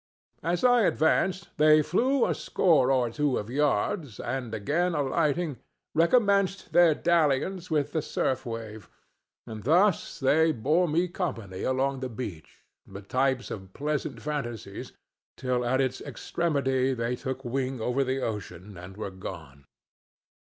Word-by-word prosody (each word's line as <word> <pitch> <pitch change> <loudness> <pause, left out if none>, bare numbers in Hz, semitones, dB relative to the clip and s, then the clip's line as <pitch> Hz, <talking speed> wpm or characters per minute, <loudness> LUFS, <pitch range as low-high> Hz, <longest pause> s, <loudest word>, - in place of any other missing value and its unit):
As 175 +1 -1
I 245 -1 +5
advanced 185 +1 +1
they 155 0 +6
flew 250 - +2
a - - +1
score 155 -8 +2
or 125 -3 +2
two 145 +1 0
of 105 +3 -5
yards, 145 - 0
and, 125 -2 -4
again 155 - 0
alighting, 145 +1 0 0.3
recommenced 200 +2 +2
their 170 -3 +6
dalliance 170 +3 +1
with 145 -2 0
the 160 - 0
surf 130 -2 -1
wave; 115 -3 -7 0.6
and 110 -1 -7
thus 175 - +2
they 160 +4 +3
bore 155 +9 +2
me 170 +4 +1
company 115 - -4
along 135 +1 0
the 130 0 -4
beach, 105 - -8 0.2
the 100 +1 -9
types 130 +4 0
of 95 -2 -8
pleasant 145 -5 -3
fantasies, 140 -7 -5 0.5
till 125 -1 -1
at 125 +2 +1
its 130 -1 -1
extremity 135 -2 -1
they 120 +1 -1
took 130 +1 -5
wing 130 +1 -2
over 125 +4 0
the 130 0 -2
ocean 100 -4 -6
and 95 +2 -11
were 105 -2 -5
gone. 80 -7 -9
135 Hz, 140 wpm, -27 LUFS, 115-160 Hz, 0.6 s, they